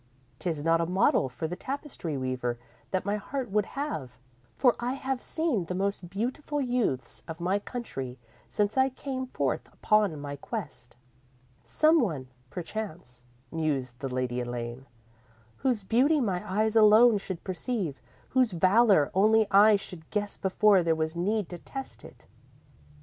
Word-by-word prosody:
'Tis 160 -5 -2
not 165 +1 +3
a 165 - 0
model 180 -7 +3
for 125 +6 -4
the 175 - -4
tapestry 265 - -5
weaver 130 -2 -2 0.3
that 185 -1 -1
my 205 +1 0
heart 250 +3 -4
would 210 0 +1
have, 150 - -4 0.4
for 250 -3 +4
I 245 +2 -1
have 265 -1 -3
seen 315 - 0
the 180 - -4
most 195 -2 -2
beautiful 255 - -2
youths 245 - -1
of 165 0 -7
my 185 +4 +1
country 135 - -6 0.3
since 210 +3 0
I 265 0 +4
came 260 0 -5
forth - - -2
upon 210 -8 +2
my 145 0 -6
quest._ 150 - -7 0.7
_"Some 310 - +4
one, 150 - -2 0.2
perchance," 170 - -6 0.3
mused 135 -6 -2
the 135 - -3
Lady 125 -1 -2
Elaine, 120 +1 -5 0.7
"whose 245 -6 0
beauty 260 +10 +3
my 190 -8 0
eyes 215 +3 +1
alone 220 +1 +7
should 190 -3 -6
perceive, 185 - -3 0.3
whose 255 -5 +2
valour 185 -2 +4
only 215 +3 +4
I 210 +2 +7
should 180 -5 -7
guess 205 -1 -2
before 195 0 +4
there 165 -1 +2
was 160 +1 -2
need 200 +3 0
to 175 - -7
test 270 +8 -8
it. - - -14
195 Hz, 150 wpm, -28 LUFS, 155-230 Hz, 0.7 s, alone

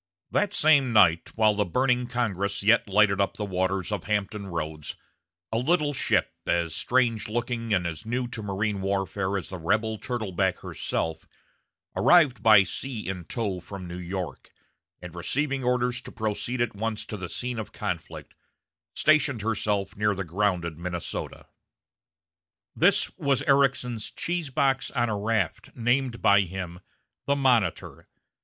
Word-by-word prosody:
That 205 - +1
same 145 -5 +4
night, 90 -6 +5
while 110 -1 +4
the 105 0 +1
burning 125 +5 +1
Congress 100 -5 -1
yet 110 0 +4
lighted 100 0 +4
up 100 - -1
the 105 - -2
waters 95 0 -1
of 100 -4 -3
Hampton 105 -1 -2
Roads, 80 -4 -5 0.6
a 110 - +1
little 150 +2 +1
ship, - - +1 0.2
as 85 -2 +1
strange 115 +2 +1
looking 120 0 -2
and 90 -4 +2
as 80 -3 -4
new 120 +2 -2
to 115 - -6
marine 100 0 -2
warfare 95 0 -1
as 95 - -6
the 95 - -6
rebel 110 +6 0
turtleback 110 -8 -1
herself, 80 -1 -3 0.7
arrived 155 -8 +5
by 110 -3 +7
sea 115 +4 -5
in 90 -3 -4
tow 100 -5 -3
from 95 +1 -8
New 90 +1 -6
York, 90 0 -5 0.5
and 90 - -8
receiving 135 - -1
orders 125 0 +1
to - - -10
proceed 115 +3 -2
at 115 -3 -1
once 110 +1 -3
to - - -6
the 95 -4 -6
scene 125 -2 -3
of 110 - -6
conflict, 95 -7 -5 0.6
stationed 145 -7 +3
herself 105 -3 -1
near 105 0 +1
the 100 - -3
grounded 85 -2 -1
Minnesota. 85 0 -5 1.3
This - - +3
was 140 -1 +1
Ericsson's 135 -5 +2
"cheese 175 -4 -3
box 135 -1 +1
on 120 -3 0
a 105 - -1
raft," 105 -2 -1
named 120 +1 0
by 100 0 +6
him 90 -2 -5 0.5
the 140 - +3
Monitor. 130 -6 +1
105 Hz, 150 wpm, -26 LUFS, 95-125 Hz, 1.3 s, by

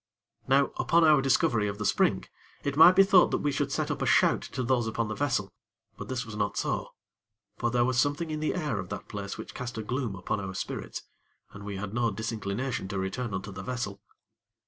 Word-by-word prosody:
Now, 135 +1 +3
upon 170 0 +3
our 155 -3 +6
discovery 120 -5 +2
of 100 0 -4
the 105 - -4
spring, - - +2 0.4
it 140 -1 -2
might 170 +4 +8
be 195 - +8
thought 190 -2 +5
that - - +1
we 145 - +1
should 140 0 -1
set - - -1
up - - -4
a - - 0
shout - - +4
to 130 +2 -4
those 120 -1 +1
upon 110 0 -2
the - - -2
vessel; 125 -6 -1 0.4
but - - -8
this 130 -1 -3
was 115 -2 -8
not 105 -1 -1
so; - - -2 0.6
for 120 - +1
there 120 0 +2
was 125 -1 +1
something 150 +4 0
in 155 - -2
the 155 - -1
air 150 - -1
of 90 - -6
the 100 - -3
place 100 -1 -7
which - - -8
cast 120 -2 -6
a 110 - -3
gloom 120 -2 -2
upon 95 +2 -3
our 95 -1 -5
spirits, - - -5 0.5
and 100 0 -10
we 100 -1 -5
had 100 +1 -5
no 120 0 +1
disinclination 110 +1 -3
to 100 0 -4
return 95 +5 -3
unto 95 +1 -4
the 95 0 -7
vessel. 120 -4 -4
120 Hz, 225 wpm, -28 LUFS, 100-135 Hz, 0.6 s, might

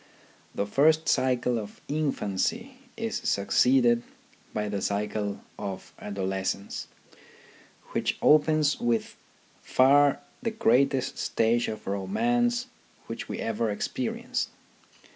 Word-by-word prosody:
The 100 - 0
first 155 +9 +3
cycle 125 -2 +2
of 105 -1 -9
infancy 150 - -1 0.2
is 225 -1 -2
succeeded 120 +4 +3 0.5
by 105 0 -2
the 100 -1 -2
cycle 105 0 -2 0.2
of 95 -1 -6
adolescence, 95 0 -3 1.0
which - - -1
opens 155 -1 +4
with 120 -2 0
by - - -32
far 140 +2 +4 0.2
the 230 - 0
greatest 140 - +2
stage 115 +1 +1
of 110 - -6
romance 240 - 0 0.4
which 115 - -6
we - - -3
ever 115 0 -1
experience. 105 - -2
120 Hz, 105 wpm, -27 LUFS, 105-155 Hz, 1.0 s, opens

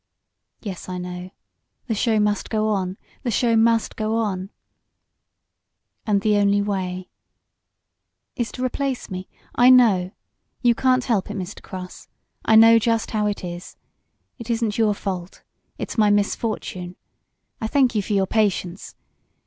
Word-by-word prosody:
"Yes, 190 -4 -6
I 180 - -4
know. 180 0 -6 0.6
The 230 - -1
show 220 0 +1
must 210 0 0
go 215 -1 0
on 190 -2 -1 0.2
the 245 - -2
show 235 0 +2
must 225 0 +2
go 220 0 -1
on."' 195 -4 -2 1.6
"And 200 -2 +2
the 210 0 +2
only 200 0 +3
way 185 -3 -3 0.6
" - - -57
"Is 240 -3 -2
to 255 - -4
replace 265 -3 -3
me. 185 0 -6 0.2
I 245 +1 +5
know. 220 -8 +5 0.5
You 240 -1 +5
can't 255 +1 +2
help 215 -7 0
it, 210 - -5
Mr. 185 +2 -6
Cross. 185 -1 -9 0.4
I 220 - +4
know 225 +1 +8
just 230 0 0
how 210 -1 +1
it 205 -2 -3
is. 175 0 -7 0.6
It 235 0 -9
isn't 230 -2 -1
your 215 -2 +3
fault 185 -3 -5 0.3
it's - - -4
my 210 -1 +5
misfortune. 205 -3 -1 0.7
I 220 - -1
thank 260 0 +3
you 210 - +1
for 205 - -3
your 195 -1 +3
patience. 195 -3 -1
210 Hz, 150 wpm, -22 LUFS, 190-230 Hz, 1.6 s, know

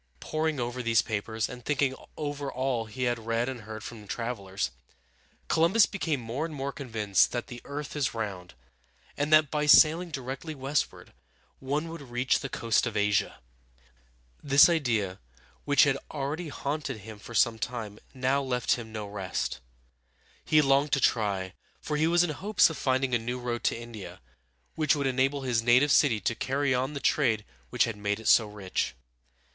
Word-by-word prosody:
Poring 155 -2 -1
over 120 +1 -3
these 115 -1 +3
papers, 110 +1 -2
and 125 -1 -10
thinking 140 -1 +1 0.2
over 145 -2 -4
all 130 -3 -1
he 110 +4 -5
had 120 -1 0
read 115 +1 0
and 130 -3 -5
heard 110 0 -8
from 110 -4 -9
travelers, 100 - -3 0.8
Columbus 170 +7 +4
became 165 -8 -2
more 120 +5 -4
and 160 -2 -5
more 140 0 -3
convinced 110 -8 +1
that 120 - -2
the 120 -1 -9
earth 145 +1 -6
is 135 -6 -1
round, 95 - -5 0.6
and 145 +1 -1
that 155 -2 +5
by 150 -1 0
sailing 165 +4 +6
directly 135 +2 -5
westward 135 +2 -2 0.5
one 145 +4 -2
would 165 -1 -8
reach 125 -1 0
the 135 - -5
coast 115 +1 +1
of 110 -2 -3
Asia. 105 0 +1 1.0
This 140 +3 +6
idea, 115 - 0 0.5
which 145 -2 +5
had 135 -1 +2
already 150 +3 -4
haunted 140 -4 -4
him 110 +1 -10
for 120 +3 -10
some 115 -2 +3
time, 110 -4 -5
now 130 +2 0
left 125 -3 -1
him 115 -2 -8
no 110 -1 -5
rest 95 -9 -3 0.8
He 155 -1 +4
longed 140 +1 +3
to 140 - +4
try, 100 -7 0 0.3
for 150 - -3
he 155 +2 +2
was 175 +1 +4
in 175 - -1
hopes 200 +2 +3
of 160 - -7
finding 130 -1 +1
a 120 - +3
new 120 +2 -3
road 120 -1 -3
to - - +1
India, 115 -4 -9 0.5
which 155 -1 +2
would 140 -1 -2
enable 135 +2 +1
his 120 -3 +1
native 125 +5 +4
city 130 -6 +4
to 115 - 0
carry 135 +3 0
on 130 +3 -1
the 140 - -4
trade 115 -8 +1 0.2
which - - +2
had 115 -3 -3
made 105 0 -1
it 110 - -6
so 110 - +6
rich. 95 -10 -3
125 Hz, 175 wpm, -28 LUFS, 110-145 Hz, 1.0 s, sailing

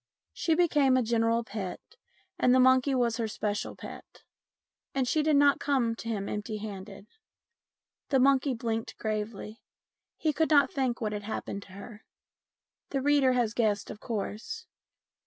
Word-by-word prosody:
She 325 - +1
became 295 -6 +3
a 255 - +2
general 230 0 +1
pet, 200 -4 -5 0.6
and 250 0 +4
the - - +5
monkey 260 +1 +4
was 235 -3 +1
her 230 -2 -1
special 210 -1 -3
pet, - - -11 0.7
and 265 -2 +1
she 310 - +2
did 305 0 +2
not 285 0 +5
come 260 -5 +1
to 230 - -6
him 200 -3 -2
empty 210 +1 -4
handed. 200 -1 -8 1.0
The 270 - +3
monkey 270 0 +3
blinked 225 -1 -3
gravely. 215 0 -4 0.6
He 310 -2 0
could 320 +2 +1
not 285 -4 +5
think 255 -4 -1
what 215 -1 -1
had 210 - -3
happened 205 -1 -5
to 190 - -16
her. 210 +2 -11 0.9
The 270 -2 -2
reader 285 -3 +4
has 240 -3 +1
guessed, 215 -4 0
of 210 - -9
course. 225 - -5
235 Hz, 155 wpm, -29 LUFS, 215-270 Hz, 1.0 s, the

